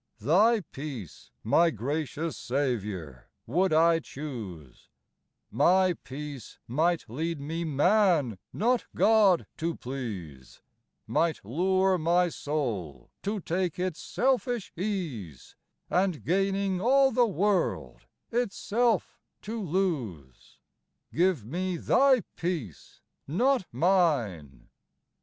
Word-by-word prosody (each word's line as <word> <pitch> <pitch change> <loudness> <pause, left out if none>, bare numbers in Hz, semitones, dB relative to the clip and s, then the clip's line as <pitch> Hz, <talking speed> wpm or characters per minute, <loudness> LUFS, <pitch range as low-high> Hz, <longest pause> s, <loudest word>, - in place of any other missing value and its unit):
Thy 205 - +4
peace, 135 - -8
my 165 +10 +4
gracious 150 +4 -3
Saviour, 105 - -3 0.2
would 180 +9 +1
I 165 +1 +4
choose, 110 - -8 0.6
My 180 - +4
peace 140 -3 -8
might 160 +6 +1
lead 160 +7 -3
me 160 +4 -4
man, 155 - +2
not 240 +3 +1
God, 210 -5 +4
to 165 +1 -2
please, 100 - -7 0.4
Might 165 -10 0
lure 185 - +2
my 175 +2 +3
soul 110 - -4
to 205 +1 -2
take 175 0 -1
its 180 -2 -3
selfish 245 -4 -1
ease, 160 - -5 0.3
And, 180 -4 0
gaining 195 +1 0
all 270 +4 +4
the 245 -2 +3
world, 200 0 -1 0.2
itself 235 -1 0 0.2
to 225 +2 -4
lose, 145 - -3 0.6
Give 175 - +2
me 180 +7 -2
Thy 265 +6 +4 0.2
peace, 160 - -5 0.3
not 240 - +1
mine. 140 - +1
165 Hz, 100 wpm, -28 LUFS, 125-190 Hz, 0.6 s, Thy